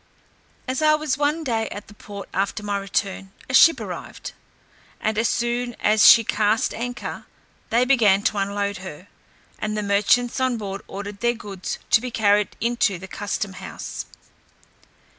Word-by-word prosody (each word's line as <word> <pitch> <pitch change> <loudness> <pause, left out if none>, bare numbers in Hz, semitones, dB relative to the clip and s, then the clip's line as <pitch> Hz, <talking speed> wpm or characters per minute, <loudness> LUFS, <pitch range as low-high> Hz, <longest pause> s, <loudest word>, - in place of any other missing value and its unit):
As 260 +2 -2
I 305 0 +5
was 305 -3 -1
one 295 +3 0
day 225 -5 -1
at 205 - -8
the 210 - -14
port 200 -1 -9
after 200 +2 -1
my 205 -1 -2
return, 195 -1 -3 0.2
a 260 - -6
ship 330 +5 +7
arrived, - - -7 0.7
and 220 - -1
as 225 +2 +1
soon 240 0 -1
as 215 0 +5
she 230 - +9
cast 215 +1 +1
anchor, 245 +1 -5 0.4
they 240 +2 +3
began 215 -7 +4
to 205 - +1
unload 200 0 -1
her, 180 -1 -10 0.5
and 215 0 -2
the 210 - -1
merchants 210 +5 +2
on 260 -2 +1
board 200 -2 -5
ordered 200 +1 -7
their 240 +1 +1
goods 195 -4 -6
to 220 - +6
be 250 - -4
carried 210 -3 +2
into 235 -5 +1
the 190 +2 -10
customhouse. 195 -1 -5
210 Hz, 160 wpm, -23 LUFS, 200-240 Hz, 0.7 s, she